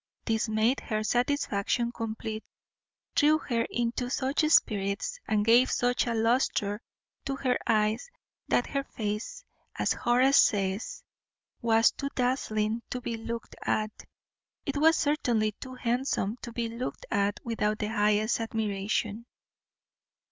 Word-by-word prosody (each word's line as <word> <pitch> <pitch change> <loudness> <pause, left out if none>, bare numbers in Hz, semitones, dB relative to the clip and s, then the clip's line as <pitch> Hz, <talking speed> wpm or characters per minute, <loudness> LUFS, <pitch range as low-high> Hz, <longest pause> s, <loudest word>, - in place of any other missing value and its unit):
This 225 0 0
made 220 +5 +2
her 215 -1 -2
satisfaction 240 -2 0
complete, 220 -1 -5 0.7
threw 305 +1 +5
her 235 -6 -1
into 240 +1 -1
such 270 +3 0
spirits, 200 -9 +2
and 210 -1 +1
gave 240 +3 +6
such 245 0 +1
a 235 - 0
lustre 225 -2 +1 0.4
to 275 - -1
her 255 -2 0
eyes, 215 - +1 0.4
that 245 - +2
her 275 -1 -2
face, 220 - -5 0.3
as - - +1
Horace 255 +3 +4
says, 195 0 0 0.6
was 225 -1 +4
too 280 - -4
dazzling 230 -3 0
to 250 - -3
be 240 -1 -4
looked 230 0 -6
at; 215 0 0 0.7
it 275 +1 -2
was 320 +2 +5
certainly 240 -8 +1
too 255 +5 -10
handsome 240 -3 -1
to 235 - -7
be 230 0 -2
looked 235 +3 -5
at 205 0 +1
without 215 -2 0
the 210 - -2
highest 210 +1 +2
admiration. 215 0 -2
230 Hz, 130 wpm, -28 LUFS, 215-250 Hz, 0.7 s, gave